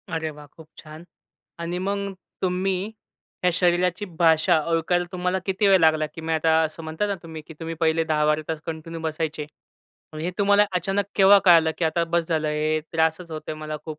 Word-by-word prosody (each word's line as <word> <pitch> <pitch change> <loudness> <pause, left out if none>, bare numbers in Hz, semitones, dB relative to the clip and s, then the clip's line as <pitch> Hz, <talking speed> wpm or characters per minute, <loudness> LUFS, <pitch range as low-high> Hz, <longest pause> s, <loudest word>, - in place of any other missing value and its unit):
अरे 160 -1 -2
वाह! 150 0 -13
खूप 160 +2 -16
छान. 155 +1 -11 0.6
आणि 170 +1 -3
मग 200 +1 -2 0.3
तुम्ही 185 +2 -1 0.5
या 180 - +4
शरीराची 180 +2 +1
भाषा 165 0 +4
ओळखायला 175 +2 +1
तुम्हाला 180 0 -1
किती 195 +1 +1
वेळ 195 -1 +6
लागला, 155 -1 +3
की 150 +2 -10
मी 160 0 -2
आता 160 0 +2
असं 160 +1 -5
म्हणताय 160 +6 -2
ना 200 - -1
तुम्ही, 160 -1 -8
की 160 - -10
तुम्ही 165 0 -5
पहिले 165 0 +2
10-12 150 -1 +1
तास 160 -1 -2
कंटिन्यू 165 0 -6
बसायचे, 160 -1 -3 0.7
मग 155 - -7
हे 170 +3 -2
तुम्हाला 205 +1 +4
अचानक 195 +3 0
केव्हा 200 0 +7
कळलं, 165 -3 +6
की 175 - 0
आता 170 +1 +1
बस 170 0 0
झालं 160 -2 0
हे 155 +1 0
त्रासच 160 +1 0
होतोय 155 0 -6
मला 155 0 -6
खूप. 155 -2 -7
165 Hz, 190 wpm, -24 LUFS, 155-180 Hz, 0.7 s, केव्हा